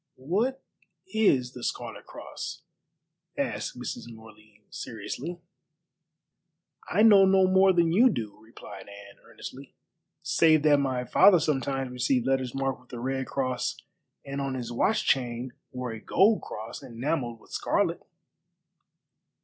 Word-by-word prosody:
"What 210 - -1 0.5
is 130 - +2
the 125 - -9
Scarlet - - -5
Cross?" - - -8 0.7
asked - - -3
Mrs. 120 - -6
Morley 110 -1 -16
seriously. 130 +10 -6 1.5
"I 210 - +3
know 205 -3 +8
no 190 0 +5
more 190 +1 +5
than 170 -2 +2
you 235 +9 +6
do," 110 - -4
replied 105 -3 -12
Anne 100 0 -13
earnestly, 135 +1 -11 0.5
"save 160 -1 +4
that 150 -2 +5
my 130 -3 -1
father 185 +7 +6
sometimes 135 -3 -1
received 125 0 0
letters 130 -2 0
marked 135 -2 -2
with 125 - -20
a 120 - -5
red 130 +1 -2
cross 130 -2 -2 0.5
and 140 0 -4
on 135 -1 -2
his 120 -2 -5
watch 205 - +1
chain 125 -1 0 0.2
wore 125 -1 -4
a 110 -1 -8
gold 205 - +3
cross 110 +1 -8
enamelled 120 -1 -3
with - - -21
scarlet." - - 0
130 Hz, 135 wpm, -27 LUFS, 120-165 Hz, 1.5 s, know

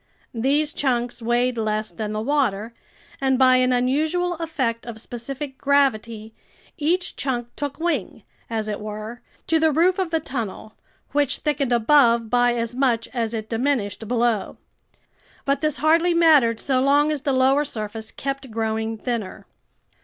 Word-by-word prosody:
These 285 +6 +1
chunks 245 -3 -1
weighed 240 +1 +1
less 215 0 -1
than 215 -2 -4
the 215 0 -2
water, 235 -5 0 0.5
and 265 -1 +2
by 255 -1 +5
an 255 0 +2
unusual 310 +8 +1
effect 265 -9 -2
of 225 -2 -6
specific 265 +4 -6
gravity, 230 -6 +1 0.4
each 350 +3 0
chunk 240 -3 -2
took 285 -1 -4
wing, 300 - -2 0.3
as 220 -2 -2
it 210 -1 -3
were, 215 +3 -7 0.2
to 325 - +2
the 320 0 +3
roof 355 +5 +3
of 370 -3 0
the 325 -1 +1
tunnel, 225 -7 -5 0.4
which 285 -1 +1
thickened 285 -4 -1
above 235 -2 +4
by 245 -1 +3
as 230 0 -2
much 245 -3 0
as 230 -2 -2
it 220 -1 -4
diminished 225 -3 -1
below. 235 -2 0 0.9
But 275 0 +1
this 305 -3 0
hardly 330 +5 +3
mattered 295 -9 +5
so 260 -2 +1
long 290 +3 +3
as 295 -3 -2
the 280 - 0
lower 265 +2 +3
surface 220 -4 -6
kept 275 -1 -5
growing 220 0 -2
thinner. 230 -4 -4
250 Hz, 155 wpm, -23 LUFS, 225-290 Hz, 0.9 s, by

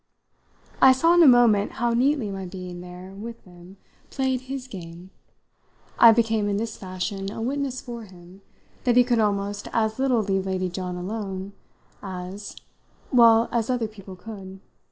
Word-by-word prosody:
I 265 - +8
saw 330 +6 +3
in 350 - +6
a 325 - +8
moment 235 -5 +5
how 235 +1 0
neatly 255 -3 +1
my 195 -1 -5
being 180 -1 -8
there 180 +1 -10
with 230 +4 -9
them 180 +1 -15 0.3
played 265 -2 -1
his 260 0 -6
game; 175 -3 -10 0.9
I 230 - +10
became 220 -2 +1
in 200 - 0
this 220 +1 -3
fashion 195 +1 -5
a - - -7
witness 265 +2 -2
for 240 -2 -7
him 185 0 -16 0.4
that 245 -2 +3
he 250 - +8
could 240 -2 +1
almost 205 -1 -1
as 220 0 0
little 255 -4 +2
leave 195 -1 -1
Lady 185 -1 -1
John 180 0 -5
alone 195 +1 -5 0.5
as 190 +1 -7 0.6
well, 230 -2 +6
as 235 0 -1
other 245 -3 0
people 195 -3 -12
could. 190 -1 -10
205 Hz, 160 wpm, -24 LUFS, 190-240 Hz, 0.9 s, I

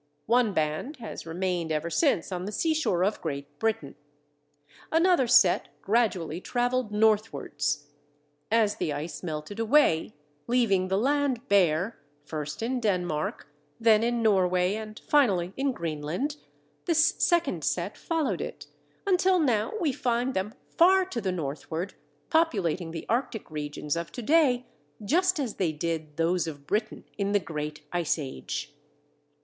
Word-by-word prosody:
One 235 -1 +3
band 155 - -1
has 225 -8 -8
remained 175 -1 -2
ever 155 +2 -1
since 275 - +2
on 180 0 -3
the 205 - -4
seashore 310 - +1
of 205 +3 0
Great 145 -2 -5
Britain; 225 0 -1 1.0
another 330 -5 +4
set 235 -7 +5
gradually 195 -7 +1
travelled 245 -1 0
northwards. 210 -9 +1 0.6
As 220 -2 +2
the 155 - -1
ice 150 +1 -5
melted 155 +4 -5
away, 225 - +3 0.3
leaving 220 -7 +2
the 190 +1 +1
land 270 +1 +1
bare, 185 +1 +2 0.3
first 150 +4 -5
in 250 +2 -1
Denmark, 180 -8 -1 0.3
then 225 -2 +5
in 235 0 0
Norway, 185 -3 +3
and 215 0 -6
finally 195 -11 +3
in 275 0 0
Greenland, 170 - -3 0.5
this 325 -2 +4
second 325 - +2
set 180 +6 -1
followed 325 -4 -1
it, - - -6 0.4
until 375 -1 +3
now 240 -10 +1
we 325 -6 +1
find 245 0 0
them 190 +3 -2
far 375 +2 +4
to 265 -11 -4
the 190 - -1
northward, 160 +2 -4 0.4
populating 195 - +1
the 165 0 -6
Arctic 235 - -2
regions 150 0 -3
of 170 0 -4
to 245 - -6
day 260 -3 +3 0.4
just 365 - +2
as 255 -6 -3
they 180 -4 +1
did 155 -1 -4
those 165 +1 +1
of 145 -3 -7
Britain 215 +7 -2 0.2
in 200 0 0
the 205 - +4
Great 150 -3 -5
Ice 170 -3 +1
Age. 135 - -5
205 Hz, 140 wpm, -27 LUFS, 165-250 Hz, 1.0 s, set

